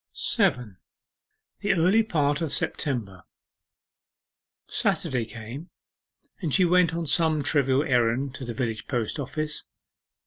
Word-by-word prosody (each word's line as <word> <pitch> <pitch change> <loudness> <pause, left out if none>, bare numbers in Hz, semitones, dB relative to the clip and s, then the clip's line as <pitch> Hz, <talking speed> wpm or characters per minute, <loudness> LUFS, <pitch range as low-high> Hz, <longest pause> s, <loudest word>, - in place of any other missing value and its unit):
7. 110 -7 0 0.8
THE 205 - +1
EARLY 185 +5 +4
PART 150 -8 0
OF 160 -4 -2
SEPTEMBER 105 - -2 1.5
Saturday 125 -4 0
came, 115 +9 -9 0.7
and 165 -5 -2
she 185 +5 +4
went 175 -1 +3
on 170 0 -2
some 155 -1 +3
trivial 140 -2 +2
errand 125 0 +1
to 135 - -7
the 120 -2 -5
village 115 -3 -3
post 120 +1 -2
office. 150 +2 -3
140 Hz, 115 wpm, -26 LUFS, 120-165 Hz, 1.5 s, EARLY